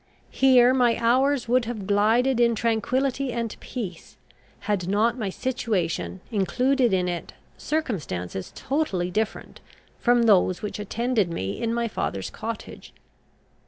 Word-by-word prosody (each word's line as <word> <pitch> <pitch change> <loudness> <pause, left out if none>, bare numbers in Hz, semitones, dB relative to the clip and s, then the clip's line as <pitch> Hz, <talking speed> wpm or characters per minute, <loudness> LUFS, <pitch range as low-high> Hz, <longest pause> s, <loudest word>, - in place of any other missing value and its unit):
Here 255 -2 +5
my 245 -3 +3
hours 255 +3 +2
would 245 0 +2
have 220 -4 -5
glided 225 +6 +2
in 235 -1 +4
tranquillity 250 +4 0
and 230 -2 -3
peace, 195 -9 -7 0.4
had 200 -4 -1
not 215 +4 +2
my 220 -6 -3
situation 190 -7 -2
included 245 +5 +2
in 185 -1 +1
it 175 -1 -4 0.2
circumstances 150 - -3
totally 200 - -1
different 220 +3 -3 0.4
from 240 -1 +3
those 190 -4 +3
which 210 - -4
attended 220 -1 0
me 100 - -4
in 230 - 0
my 235 0 0
father's 100 - -3
cottage. 225 0 -7
230 Hz, 125 wpm, -25 LUFS, 195-250 Hz, 0.4 s, Here